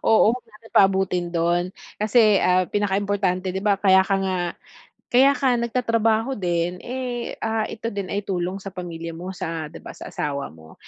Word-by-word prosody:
Oo, 220 0 +6
'wag 250 - -9
natin 225 +1 -18
paabutin 190 -2 +3
dun, 170 +1 +2 0.3
kasi, 215 -1 +4
ah, 180 0 +4
pinakaimportante 195 -2 0
di 190 - -3
ba 205 -1 +3
kaya 190 -1 +5
ka 195 - +1
nga 185 -1 -1 0.8
kaya 270 +3 +7
ka 265 -3 +2
nagtatrabaho 230 0 +1
din 175 -2 -1
eh, 250 -1 -4
ah, 225 0 -1
ito 225 - -6
din 200 -2 -4
ay 205 0 -3
tulong 185 0 -2
sa 195 -1 -9
pamilya 170 -2 -6
mo, 180 +3 -6
sa, 165 -2 -4
di - - -10
ba, - - -10
sa - - -9
asawa 140 -1 -3
mo. 80 0 -15
195 Hz, 175 wpm, -23 LUFS, 180-225 Hz, 0.8 s, kaya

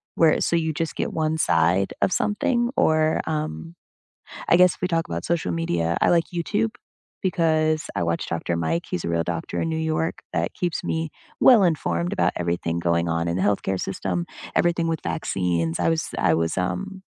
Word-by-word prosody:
where 160 -2 +4
so 170 - +1
you 160 -1 +1
just 165 +1 -3
get - - -2
one 160 0 0
side 90 - +2
of - - +2
something 240 +2 +1
or, 155 0 +3
um 85 - -3 0.7
I 170 - +6
guess 180 -1 +5
if - - -33
we 180 - 0
talk 165 -2 0
about 85 +1 -4
social 165 - 0
media, 85 0 0
I - - +4
like 170 -1 +4
YouTube 205 +6 0 0.5
because 155 -4 +1
I 95 - -1
watch 85 0 -1
Dr. 85 0 -2
Mike. 85 0 -1
He's 85 - -3
a - - -1
real 85 0 +1
doctor 85 0 -3
in 165 - -1
New 160 - -1
York 160 0 -1
that 85 -1 -1
keeps 175 -2 -2
me 160 -1 -2 0.3
well-informed 155 - +4
about - - +2
everything 85 -1 -1
going 85 0 +1
on 85 +1 0
in 85 - -1
the 95 - 0
healthcare 100 -1 0
system, 90 -2 -2 0.3
everything 170 -1 +2
with 165 -1 -1
vaccines. 85 -1 -1
I - - +2
was 160 -1 -1
I 80 - +3
was, 80 +2 0
um, 190 - -3
105 Hz, 190 wpm, -24 LUFS, -, 0.7 s, I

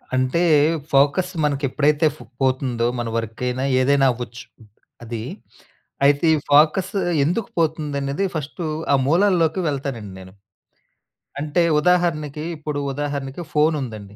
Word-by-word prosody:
అంటే 130 +6 +1 0.5
ఫోకస్ 145 +7 +3
మనకెప్పుడైతే 145 +2 +1
ఫ్ - - -16 0.2
పోతుందో, 130 -3 +1
మన 120 - -2
వర్క్ 115 0 -5
అయినా 125 +1 -2 0.2
ఏదైనా 140 +1 +3
అవ్వచ్చు. 120 -1 -7 0.6
అది 115 -1 -5 0.8
అయితే 145 +3 +3
ఈ - - 0
ఫోకస్ 155 +6 +4 0.3
ఎందుకు 180 +9 -1
పోతుందనేది 150 0 -1
ఫస్ట్ 155 +3 -5 0.3
ఆ - - +6
మూలాల్లోకి 170 +1 +2
వెళ్తానండి 135 -8 -5
నేను. 95 0 -13 1.1
అంటే 150 +4 0 0.2
ఉదాహరణకి, 155 -3 +1
ఇప్పుడు 150 -1 -4
ఉదాహరణకి 140 +2 -4
ఫోను 155 +1 +3
ఉందండి. 105 -4 -9
145 Hz, 115 wpm, -21 LUFS, 130-155 Hz, 1.1 s, ఆ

